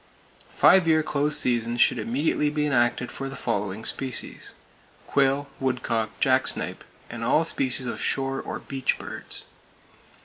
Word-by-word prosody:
Five 190 -3 +5
year 155 -1 +4
close 150 0 +1
seasons 120 -1 0
should 120 - +4
immediately 140 +6 0
be 150 0 -1
enacted 125 -3 +1
for 135 0 -5
the 135 - -8
following 100 -2 -3
species: 130 -2 -1 0.5
quail, 140 +1 +1
woodcock, 120 -4 -2
jacksnipe - - 0 0.2
and - - -7
all - - +3
species 130 0 +1
of 120 - -4
shore 135 0 0
or - - -5
"beach" 135 -2 -2
birds. - - -8
135 Hz, 135 wpm, -25 LUFS, 120-140 Hz, 0.5 s, Five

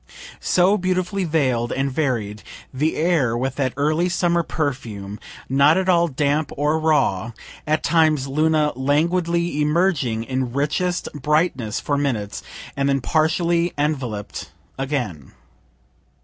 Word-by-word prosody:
So 185 +4 +3
beautifully 185 +1 -1
veiled 130 -7 0
and 135 +1 -1
varied 120 -8 -2 0.3
the 150 +5 0
air, 155 -8 +1
with 130 +1 -1
that 130 -3 -1
early 155 +5 +1
summer 175 -1 +1
perfume, 115 -11 -4 0.3
not 140 +5 +4
at 190 0 0
all 170 -2 +4
damp 145 +1 0
or 150 +2 +1
raw 120 -9 +1 0.3
at 155 +1 +1
times 155 -5 +3
Luna 155 +1 +2
languidly 170 +4 +1
emerging 150 -8 +1
in 130 0 -3
richest 150 +6 -1
brightness 145 -6 0
for 145 -1 -1
minutes, 110 -8 -2 0.3
and 140 0 0
then 135 0 +2
partially 170 +4 +1
envelop'd 135 -9 -3 0.3
again. 125 - -4
150 Hz, 120 wpm, -22 LUFS, 130-170 Hz, 0.3 s, not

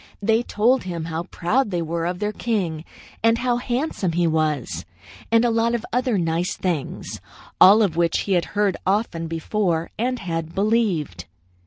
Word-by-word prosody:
They 225 +2 +2
told 240 +3 +2
him 170 -3 -5
how 165 +1 -4
proud 215 +8 0
they 175 -3 -1
were 165 +1 -2
of 180 0 -2
their 210 +2 -1
king, 185 -9 -2 0.4
and 230 +1 +4
how 245 0 0
handsome 245 - -2
he 175 +1 +2
was, 155 - 0 0.5
and 230 +1 +4
a 235 - +2
lot 230 +1 +2
of 235 - -4
other 250 -3 +1
nice 170 0 0
things, 170 -7 -3 0.4
all 210 +4 +8
of 180 -6 0
which 170 -1 +2
he 200 - -4
had 175 -2 +2
heard 205 -2 +2
often 190 -4 0
before 165 0 -1
and 250 +2 0
had 165 -5 -4
believed. 190 - 0
185 Hz, 170 wpm, -22 LUFS, 165-230 Hz, 0.5 s, all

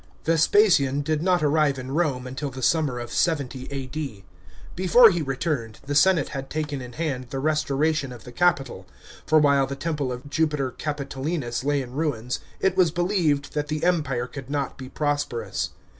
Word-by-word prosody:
§ - - -29 0.2
2. 165 - +2
Vespasian 165 -5 +4
did 155 +1 -1
not 180 -1 +2
arrive 150 -2 +2
in 130 0 -6
Rome 140 -5 0
until 130 +3 -4
the 130 -1 -8
summer 150 -5 +2
of 120 -1 -6
70 140 -6 -1
A.D. 135 -5 -5 0.5
Before 195 +6 +7
he 175 -2 -1
returned, 135 -5 -2
the 145 - -3
senate 165 +1 +4
had 135 0 -6
taken 150 -3 -3
in 125 -1 -9
hand 135 -4 -3
the 135 - -4
restoration 150 0 0
of 120 -2 -10
the 125 - -10
Capitol, 135 - 0 0.4
for 155 - +5
while 140 -3 +4
the 140 - -4
temple 145 -2 -2
of 125 +3 -7
Jupiter 150 -3 0
Capito 140 -3 -5
linus 135 -6 -2
lay 145 -1 +1
in 125 - -10
ruins, 130 -5 -2 0.2
it 190 -1 +1
was 185 -3 +4
believed 170 -5 0
that 150 -1 -2
the 155 +1 -3
Empire 150 -9 +1
could 135 0 -9
not 140 -2 -2
be 130 -1 -9
prosperous. 145 -9 -2
145 Hz, 185 wpm, -24 LUFS, 130-155 Hz, 0.5 s, Before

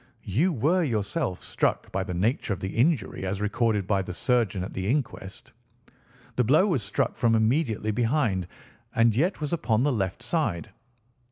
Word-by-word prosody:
"You 130 - +2
were 165 +7 +2
yourself 105 - -2
struck - - -1
by 95 - -1
the 90 -2 -5
nature 105 +3 0
of 95 - -6
the 95 - -5
injury 130 - +1
as 95 +1 -2
recorded 105 -1 0
by 100 0 +1
the 90 -1 -6
surgeon 110 -6 +1
at 95 - -7
the 95 0 -3
inquest. 120 -8 -3 0.9
The 125 - +4
blow 150 - +4
was 170 - +1
struck 100 0 -1
from 115 -3 +2
immediately 110 -1 +1
behind, 115 - 0 0.5
and 115 -2 +4
yet 170 - +1
was 150 +1 -3
upon 120 -8 +1
the 145 -1 +2
left 95 -5 -2
side. 110 - -1
110 Hz, 170 wpm, -26 LUFS, 100-140 Hz, 0.9 s, The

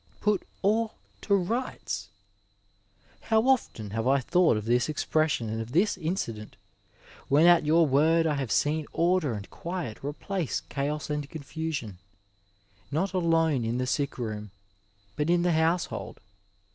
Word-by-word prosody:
PfU 210 -2 +1 0.2
all 220 +3 +1 0.3
to 200 - +2
rights 195 - -2 1.1
I - - -22
How 220 0 +4
often 235 - 0
have 115 +3 -1
I 140 +1 +4
thought 170 -2 +3
of 105 - -4
this 120 +5 +2
ex 155 - -2
pression 155 -7 +1
and 110 +1 -3
of 115 +2 -8
this 195 +6 +3
incident 155 - -4 0.7
when 150 +4 +5
at 175 -3 +6
your 165 +2 +5
word 160 +4 +3
I 155 - +2
have 135 -5 -3
seen 150 +1 +1
order 170 -6 +2
and 105 -1 -6
quiet 170 - -5
replace 160 +4 -3
chaos 150 +2 -3
and 150 -1 -3
confusion, 145 - -5 0.9
not 175 +7 -1
alone 165 -7 +2
in 115 +2 -1
the 125 - 0
sick 140 +1 -1
room, 105 -3 -4 0.7
but 150 +2 -1
in 175 0 +3
the 175 - +2
household. 165 +2 0
155 Hz, 150 wpm, -28 LUFS, 125-175 Hz, 1.1 s, at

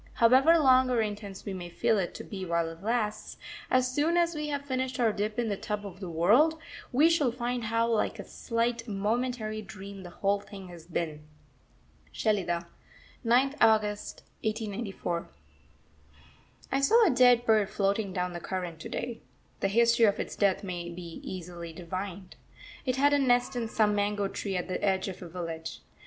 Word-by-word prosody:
However 265 +8 +6
long 260 -4 +5
or 245 -2 +2
intense 205 -2 -4
we 200 - -4
may 175 -2 -6
feel 210 +4 +1
it 180 - -3
to - - -6
be 195 -2 -6
while 170 -2 0
it 165 +1 -11
lasts, 215 -1 -2 0.3
as 255 0 +2
soon 315 +5 +2
as 340 0 +3
we 300 -1 -3
have 285 -1 -3
finished 260 -1 -2
our 225 -3 +3
dip 210 +2 -2
in 240 -1 0
the 205 - 0
tub 205 +1 -4
of 190 -2 -9
the 185 -3 -6
world, 220 - +4 0.3
we 290 +6 +5
shall 310 -7 +3
find 240 0 -3
how 230 +1 +1
like 230 -2 0
a - - -6
slight, 230 0 -2
momentary 215 +1 -1
dream 200 -1 -9
the 180 - -9
whole 200 +3 0
thing 195 -2 -11
has 170 -2 -12
been.... 160 -3 -3 0.9
SHELIDAH, 180 -6 0 0.6
9th 255 +4 +3
August 210 -2 +2 0.2
1894. 210 -5 -3 1.4
I 270 - +1
saw 450 +11 +5
a 350 - +4
dead 245 -1 +5
bird 215 -3 +3
floating 200 0 0
down 180 -1 -2
the 175 - -5
current 175 -2 -4
to - - -7
day. 235 -2 -4 0.4
The - - +1
history 235 +3 +4
of 205 - +2
its - - -4
death 200 -1 +2
may 180 -3 -4
easily 170 0 -7
be - - -15
divined. 185 +1 -6 0.5
It 255 - +2
had 285 +2 +4
a 285 - +4
nest 245 -1 +2
in 235 -2 -1
some 215 -1 +2
mango 205 0 0
tree 195 -1 -3
at 180 - -3
the 185 - -3
edge 190 -1 +1
of 185 - -8
a 175 - -8
village. 165 -2 -6
210 Hz, 180 wpm, -29 LUFS, 185-245 Hz, 1.4 s, However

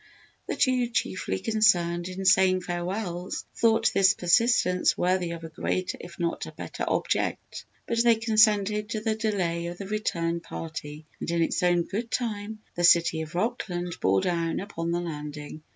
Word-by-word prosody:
The - - -2
two 255 -2 +2
chiefly 185 - -2
concerned 175 - +2
in 185 +1 -6
saying 185 -1 +5
farewells 175 +1 -4
thought 225 0 +3
this 195 -1 +5
persistence 180 0 +3
worthy 180 -1 +1
of 170 -1 -6
a 165 - -6
greater 180 +3 -2
if 175 - -11
not 170 -1 -2
a - - -8
better - - -6
object. - - -2 0.2
But 230 0 +1
they 235 -1 +5
consented 215 -2 +3
to 220 -2 -3
the 220 0 0
delay 185 -6 -1
of 175 0 -6
the 195 - -6
return 170 -5 -1
party 155 -2 -7
and - - -4
in 170 0 +2
its - - -1
own 175 -1 +3
good 215 +7 -4
time 220 -3 -3
the 175 - -3
"City 170 -2 +5
of 160 +2 -7
Rockland" 180 -4 -2
bore 95 0 +3
down 170 -2 -1
upon 170 -4 -4
the 170 +1 0
landing. 150 -2 -7
180 Hz, 170 wpm, -27 LUFS, 170-215 Hz, 0.2 s, saying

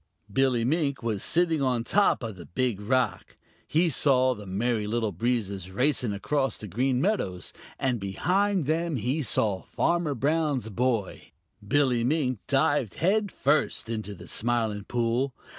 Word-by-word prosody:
Billy 125 -2 +2
Mink 140 -2 0
was 110 -4 -1
sitting 165 -3 +2
on 125 -3 +1
top 200 0 +2
of 110 -3 -5
the 85 -2 -11
Big 115 0 -1
Rock. 120 -1 -1 0.3
He 165 +3 +2
saw 130 -2 +3
the 105 -4 -10
Merry 105 +3 -1
Little 110 -1 -1
Breezes 100 -2 -2
racing 125 +2 +1
across 135 +7 -1
the 105 - -8
Green 125 +6 0
Meadows, 130 - -1 0.2
and 130 -4 0
behind 180 - 0
them 160 +2 0
he 130 +6 -1
saw 105 -7 0
Farmer 170 -4 0
Brown's 145 -2 0
boy. 115 -2 -2 0.3
Billy 125 +1 +2
Mink 130 -3 0
dived 140 -5 +1
head 200 +4 +1
first 140 -4 0
into 110 -3 -4
the - - -12
Smiling 110 -3 -1
Pool. 120 +2 0
125 Hz, 145 wpm, -27 LUFS, 110-145 Hz, 0.3 s, saw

